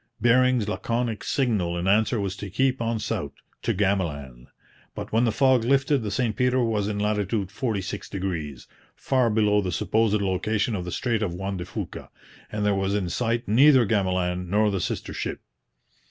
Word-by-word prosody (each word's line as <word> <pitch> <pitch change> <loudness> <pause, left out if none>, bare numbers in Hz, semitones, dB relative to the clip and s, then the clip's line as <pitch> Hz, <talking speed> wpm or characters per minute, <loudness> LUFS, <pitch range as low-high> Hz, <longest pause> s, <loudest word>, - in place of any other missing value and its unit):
Bering's 125 0 +3
laconic 115 +1 -2
signal 105 -10 0
in 85 +2 -2
answer 110 +3 +3
was 100 -1 -2
to 100 - -6
keep 130 +5 0
on 115 0 0
south 105 -9 -3 0.3
'to - - 0
Gamaland'; 75 -11 -2 0.5
but - - -6
when 115 +3 +3
the 115 - +2
fog 130 0 +3
lifted 135 +3 +2
the 105 - -3
St 115 +1 -1
Peter 125 0 +2
was 110 -3 0
in 105 -1 -2
latitude 105 -1 -1
46°, 95 - -4 0.3
far 130 -3 +1
below 105 -1 +3
the 95 -2 -3
supposed 105 +4 +1
location 100 +3 0
of 90 -3 -4
the 90 - -5
strait 115 +3 -1
of 90 -5 -2
Juan 95 +1 -4
de 90 - -5
Fuca, - - -7 0.4
and 105 -1 -2
there 105 - +3
was 95 0 0
in 95 -4 -1
sight 115 +4 -1
neither 130 +3 +6
Gamaland 90 -3 0
nor 105 +2 +2
the 95 -2 -1
sister - - -3
ship. - - -4
105 Hz, 175 wpm, -25 LUFS, 95-115 Hz, 0.5 s, neither